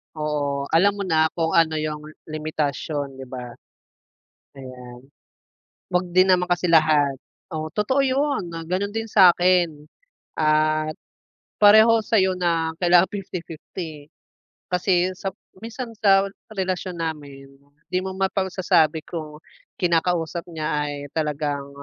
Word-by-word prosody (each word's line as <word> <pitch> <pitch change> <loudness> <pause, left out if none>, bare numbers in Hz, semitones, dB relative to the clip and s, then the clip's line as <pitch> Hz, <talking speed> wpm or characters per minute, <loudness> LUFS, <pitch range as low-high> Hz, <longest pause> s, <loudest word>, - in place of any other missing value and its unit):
Oo, 145 -2 -2
alam 195 +5 +5
mo 195 - -3
na 160 -1 +2
kung 165 -1 -1
ano 160 -2 +3
yung 150 -1 -4 0.2
limitasyon, 150 -2 -3
'di 135 - -9
ba? 125 -2 -7 1.0
Ayan. 125 -1 -11 0.8
Wag 180 0 -1
din 185 +1 +5
naman 180 -1 +2
kasi 175 0 +1
lahat, 155 -4 +4 0.3
oo 155 -2 -5
totoo 260 +7 +1
'yun 265 - 0 0.2
gano'n 195 +3 -1
din 225 +1 -4
sa 190 -4 +7
akin 175 -4 +1 0.5
at 155 0 +2 0.6
pareho 220 +2 +7
sa'yo 190 -4 +2
na 165 -2 0
kailangan 175 0 +5
50-50. 165 -5 -7 0.6
Kasi 180 0 +2
sa 195 0 -4 0.3
minsan 230 +2 -7
sa 195 -2 +5 0.3
relasyon 185 -2 -3
namin 145 -4 -6 0.4
di 185 - +1
mo 190 - -4
mapagsasabi 185 -5 +1
kung 155 -3 -7 0.4
kinakausap 170 -1 0
niya 155 -2 -4 0.2
ay 145 0 -6
talagang 145 -2 -2
165 Hz, 120 wpm, -23 LUFS, 150-185 Hz, 1.0 s, sa